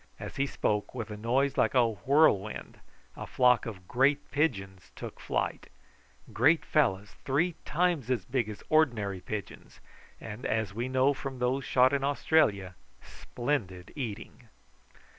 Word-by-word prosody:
As - - -8
he 140 +1 +1
spoke, 105 -3 -2
with 115 -4 -5
a - - -5
noise 125 +6 0
like - - +2
a 120 -2 +5
whirlwind 110 - +1 0.4
a - - -7
flock 125 -2 +3
of 95 -5 -8
great 140 +3 +1
pigeons 95 - -2
took - - -8
flight - - -3 0.6
great 150 +8 +3
fellows, 105 -9 +1
three 155 +6 +1
times 170 -6 0
as 120 -7 -1
big 120 -2 -1
as 105 - -9
ordinary 115 -12 +2
pigeons, 105 0 -7 0.4
and, 110 +2 -8
as 110 -3 -1
we 120 +4 -3
knew 130 +2 +3
from 135 -1 -6
those 125 +2 -1
shot 130 +1 +4
in 140 -1 0
Australia, 140 - +1 0.3
splendid 105 -9 -4
eating. 115 -2 -7
125 Hz, 140 wpm, -29 LUFS, 105-140 Hz, 0.6 s, a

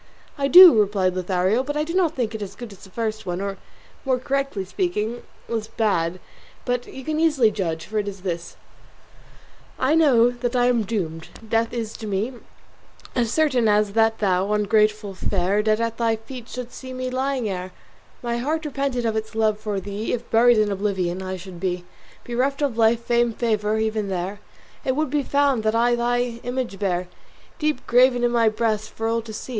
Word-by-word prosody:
"I 280 -1 0
do," 345 -6 +10
replied 195 -3 +2
Lothario, 185 +5 +1
"but 290 +2 -3
I 300 - +1
do 330 +2 -5
not 350 -4 +2
think 230 -4 -2
it 220 - -5
as 200 - -6
good 240 -3 -9
as 190 - -16
the 190 - -12
first 220 0 -4
one, 175 0 -2
or, 195 0 -4 0.4
more 260 -2 +1
correctly 275 -6 -2
speaking, 235 - -2 0.3
less 225 -2 -3
bad; 185 -7 0 0.5
but 245 -1 -1
you 265 - -9
can 310 0 -1
easily 295 -9 +3
judge, 165 -5 -3
for 215 0 -2
it 205 - -3
is 195 -2 -6
this. 170 -2 -4 1.2
SONNET 260 +2 +1
I - - +4
know 255 -7 +5
that 245 0 -3
I 245 -1 +3
am 245 -2 +3
doomed; 165 -7 -3 0.2
death 225 +1 +1
is 230 -3 -4
to 220 - -7
me 205 +5 -1 0.8
As 235 -3 0
certain 260 -6 +2
as 210 -1 +3
that 225 0 +3
thou, 195 -1 +1
ungrateful 210 -1 +2
fair, 190 +2 0
Dead 215 0 +1
at 230 0 -2
thy 230 -1 +1
feet 230 +2 -10
shouldst 245 -1 -7
see 260 -1 -8
me 255 0 -4
lying, 260 -2 -1
ere 185 -1 -4 0.5
My 235 0 -1
heart 310 +5 -2
repented 275 -4 -2
of 220 -1 0
its 220 0 -4
love 215 -1 +1
for 210 -2 -3
thee. 205 +3 -4
If 240 -1 -5
buried 235 +1 +5
in 210 -1 +2
oblivion 190 -3 -1
I 185 0 -4
should 180 -1 -10
be, 180 -1 -2 0.4
Bereft 270 +4 -1
of 275 -5 0
life, 230 +1 +3
fame, 235 -1 +2
favour, 215 -2 0
even 220 -1 -1
there 190 +2 -3 0.4
It 260 - 0
would 305 -2 -1
be 295 - +2
found 280 -3 +1
that 215 +1 0
I 240 +1 +3
thy 240 0 0
image 245 -5 -4
bear 180 -3 -1 0.5
Deep 305 -4 -1
graven 245 0 +4
in 240 - +3
my 230 -2 +4
breast 215 -1 -1
for 225 - -4
all 230 0 0
to 225 0 -10
see. 215 - -7
225 Hz, 200 wpm, -23 LUFS, 205-250 Hz, 1.2 s, do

